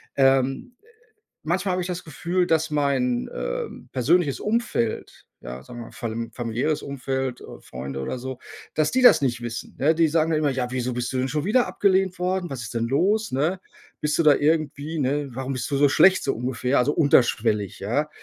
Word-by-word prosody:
Ähm, 135 - +2
äh, - - -27 0.6
manchmal 180 +4 0
habe 180 - -1
ich 180 - -3
das 180 0 -5
Gefühl, 175 +4 -1
dass 160 -1 +1
mein, 135 -4 0
ähm, - - -5
persönliches 145 +3 +2
Umfeld, 210 - -2 0.2
ja, 60 +1 -8
sagen 120 - -11
wir 115 - -7
mal, - - -14
falm 115 0 -5
familiäres 120 +6 -2
Umfeld, 130 -2 -3
äh, - - -11
Freunde 65 +1 -7
oder 65 - -3
so, 130 0 -6 0.3
dass 155 -1 +1
die 260 - +2
das 245 - +8
nicht 120 -3 -1
wissen, 120 0 -6
ne? 150 +4 +3
Die 165 0 +3
sagen 160 +1 +1
dann 155 - +2
immer: 150 -2 +1
„Ja, 125 -2 -2
wieso 125 -1 -2
bist 120 +1 -3
du - - -1
denn 130 +1 0
schon 150 +4 -2
wieder 245 +4 +3
abgelehnt 190 -2 +1
worden, 180 0 -1
was 130 -3 -5
ist 110 - -7
denn 115 0 -1
los, 205 - +1
ne? 155 +8 0 0.4
Bist 150 0 0
du 165 - +4
da 150 -2 +6
irgendwie, 155 0 0
ne 140 +1 -1
warum 130 +2 -4
bist 130 - -4
du 140 - 0
so 145 +1 +5
schlecht“, 190 +7 +5
so 135 - 0
ungefähr. 125 +2 -1
Also 140 +4 +2
unterschwellig, 120 - +2
ja? 140 +10 -1
140 Hz, 205 wpm, -24 LUFS, 125-165 Hz, 0.6 s, das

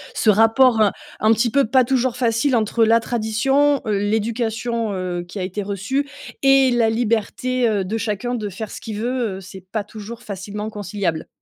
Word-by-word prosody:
ce 220 - +4
rapport, 225 +3 +4
heu, 210 - +5 0.3
un 215 - +4
petit 225 +1 +2
peu 280 +2 +3
pas 255 +3 +4
toujours 250 -1 0
facile 240 +2 +1
entre 225 0 +2
la 225 +1 +5
tradition, 260 +6 +1
heu, 210 -2 0
l'éducation, 225 +1 -1
heu, 180 -2 -3
qui 175 - -9
a 190 - -2
été 190 +3 -3
reçue 205 +9 -2 0.3
et 270 -1 +5
la 235 -2 +3
liberté, 235 +2 0
heu, 205 -3 0
de 215 +5 -2
chacun 225 +2 -2
de 215 -4 -3
faire 205 +3 -7
ce - - -8
qu'il 215 -2 -6
veut, 235 -2 -1
heu, - - -9
c'est 190 0 -11
pas 215 0 -1
toujours 215 +2 -9
facilement 205 +2 -5
conciliable. 200 -5 -3
225 Hz, 190 wpm, -21 LUFS, 205-245 Hz, 0.3 s, heu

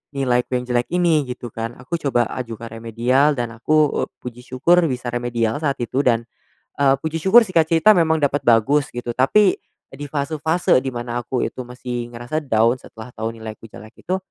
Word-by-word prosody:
nilaiku 125 -1 0
yang 125 - -5
jelek 120 0 +1
ini?" 170 -5 +2
Gitu 125 -1 -6
kan. 115 +1 -5
Aku 130 +7 -4
coba 120 -4 +1
ajukan 115 -1 -6
remedial 120 +6 +1
dan 120 -1 -3
aku, 150 +6 +1
eee, - - -24
puji 125 0 -8
syukur 130 +8 +2
bisa 125 -1 -3
remedial 120 0 -1
saat 140 -3 0
itu 130 +3 -2
dan, 115 -3 +1 0.5
eee, 135 -1 +4
puji 160 +1 -3
syukur 230 +5 +7
singkat 165 -5 +2
cerita 165 +6 +5
memang 160 -1 +3
dapat 145 0 +1
bagus 135 +6 +3
gitu, 120 -1 -4
tapi 185 - +4 0.4
di 145 - -8
fase-fase 155 +3 +1
di 130 - 0
mana 120 0 -4
aku 125 +1 -3
itu - - -5
masih 120 -1 -5
ngerasa 120 +7 -3
down 115 +1 +2
setelah 110 +1 -12
tau 110 +1 -3
nilaiku 110 0 -9
jelek 110 +2 -14
itu, 185 +2 0
125 Hz, 185 wpm, -21 LUFS, 120-150 Hz, 0.5 s, syukur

